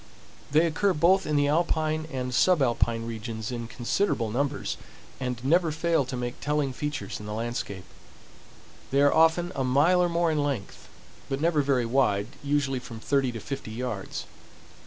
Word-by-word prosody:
They 155 +4 +4
occur 185 +4 +1
both 175 +5 +3
in 150 - 0
the 145 0 +3
alpine 155 0 +1
and 130 -1 -3
subalpine 120 -7 +2
regions 110 0 -5
in 120 -2 -4
considerable 120 - -1
numbers, 140 +4 -1 0.4
and 125 -2 -3
never 165 +3 +3
fail 160 -2 +1
to 130 0 -5
make 120 0 -4
telling 150 -2 0
features 145 +2 -4
in 105 - -8
the 105 - -4
landscape. 110 -5 -4 1.0
They 140 +1 +2
are 145 - +5
often 165 +2 +3
a 135 - -1
mile 145 +8 +4
or 175 - +2
more 170 -1 +1
in 150 -2 +1
length, 135 -9 -4 0.4
but 135 0 -1
never 160 -1 +2
very 135 -3 +1
wide—usually 135 +4 0
from 115 -2 -9
thirty 135 +1 +1
to 115 - -6
fifty 135 +1 -6
yards. 115 -5 -4
140 Hz, 160 wpm, -27 LUFS, 120-155 Hz, 1.0 s, are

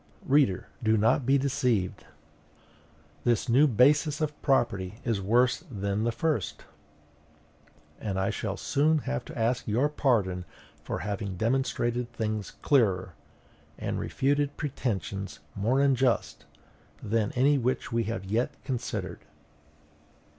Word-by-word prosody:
Reader, 135 -9 +3
do 110 -1 +3
not 115 +4 +2
be 135 +1 +5
deceived. 125 -8 0 1.2
This 120 -2 +1
new 130 +6 +5
basis 145 +5 +3
of 150 -1 -3
property 105 -8 +1
is 115 -5 0
worse 125 - +2
than 100 -1 -2
the 120 - +2
first, 140 - -2 1.3
and 95 -3 -2
I 95 +3 +1
shall 100 -1 -3
soon 150 +3 +2
have 65 0 -2
to - - -9
ask 115 +2 0
your 120 +7 +2
pardon 105 -11 +1 0.4
for - - -4
having 100 -2 -3
demonstrated 120 +1 0
things 110 -3 -2
clearer, 105 -10 +2 0.6
and - - -3
refuted 145 +1 0
pretensions 100 -9 -3
more 115 +7 +1
unjust, 130 -3 +1 0.6
than 110 0 0
any 140 +3 +3
which 125 +1 -1
we 115 -1 0
have 110 -2 -4
yet 110 +6 -1
considered. 130 -4 -4
120 Hz, 120 wpm, -28 LUFS, 105-135 Hz, 1.3 s, be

